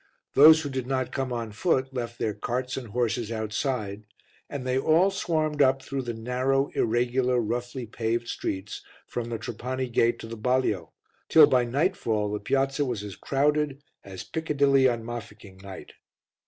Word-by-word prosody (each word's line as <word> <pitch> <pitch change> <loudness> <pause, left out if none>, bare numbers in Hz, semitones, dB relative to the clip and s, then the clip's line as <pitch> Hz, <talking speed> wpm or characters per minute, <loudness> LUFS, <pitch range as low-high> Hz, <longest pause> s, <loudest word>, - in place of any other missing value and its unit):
Those 155 +3 +8
who 145 - -3
did 130 -2 -4
not 130 -1 -1
come 135 -2 -2
on 115 -2 -3
foot 130 - 0
left 120 -2 -4
their 110 - -1
carts 125 +3 -3
and 130 -3 -6
horses 115 0 -1
outside, 110 -1 -3 0.4
and 140 -3 -5
they 130 +1 +1
all 165 +7 +4
swarmed 155 -6 0
up 135 -1 +3
through 135 0 -3
the 120 -2 -4
narrow, 130 +4 0
irregular, 125 +2 +1
roughly 120 +2 -3
paved 115 +1 -2
streets 95 +2 -4 0.2
from 120 -1 -4
the 115 - -2
Trapani 125 +3 -4
gate 120 0 +2
to - - -9
the 115 - -6
balio, 115 -6 0 0.4
till 155 -2 +9
by 125 -3 +2
nightfall 120 - 0
the 105 - -2
Piazza 135 +5 0
was 120 -6 -3
as 100 -2 -7
crowded 145 0 0 0.2
as 95 -1 -8
Piccadilly 140 -2 +2
on 115 -2 -3
Mafeking 105 -4 -8
night. 95 0 -10
125 Hz, 165 wpm, -26 LUFS, 115-135 Hz, 0.4 s, till